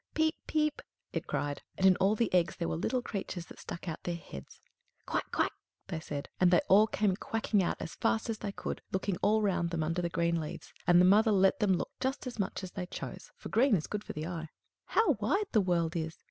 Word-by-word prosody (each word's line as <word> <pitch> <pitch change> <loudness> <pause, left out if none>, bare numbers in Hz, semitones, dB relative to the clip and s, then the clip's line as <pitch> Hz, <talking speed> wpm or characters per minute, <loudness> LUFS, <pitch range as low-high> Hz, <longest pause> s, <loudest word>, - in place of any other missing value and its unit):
"Piep! 315 0 +3
piep!" 305 -1 +1 0.3
it - - -3
cried, 145 -1 -2 0.2
and 190 - +2
in 190 -1 +7
all 200 +3 +3
the 230 -2 0
eggs 175 -2 +3
there 170 - -2
were - - -1
little 250 +9 -1
creatures 190 -5 -4
that - - -13
stuck 170 - -7
out 160 - -4
their 175 - -2
heads. 70 - -10 0.5
"Quack! - - -2
quack!" - - +1 0.4
they 165 - -2
said; 145 -2 -5
and 180 - +6
they 175 -1 +6
all 210 +3 +6
came 205 -3 +1
quacking 220 0 0
out 175 - 0
as - - -5
fast 225 -1 0
as 225 -2 -3
they 200 - -3
could, - - -5
looking 190 -1 -1
all 215 +2 +2
round 180 -4 +1
them 170 -2 -1
under 165 +3 -1
the 170 - -1
green 170 0 +1
leaves; 155 - -7
and 175 0 +7
the 180 - +7
mother 215 +4 +6
let 195 -1 +4
them 200 -2 +3
look 180 - -2
as 260 -3 -3
much 195 0 -2
as 185 - -6
they 180 -2 -5
chose, - - -7
for - - -9
green 240 +1 +4
is 155 - -1
good 210 0 -4
for - - -7
the 155 +1 -4
eye. 165 -2 -5 0.4
"How 420 - +3
wide 390 - +2
the 215 - +4
world 170 -2 +1
is!" 160 -1 -3
190 Hz, 235 wpm, -31 LUFS, 170-215 Hz, 0.5 s, in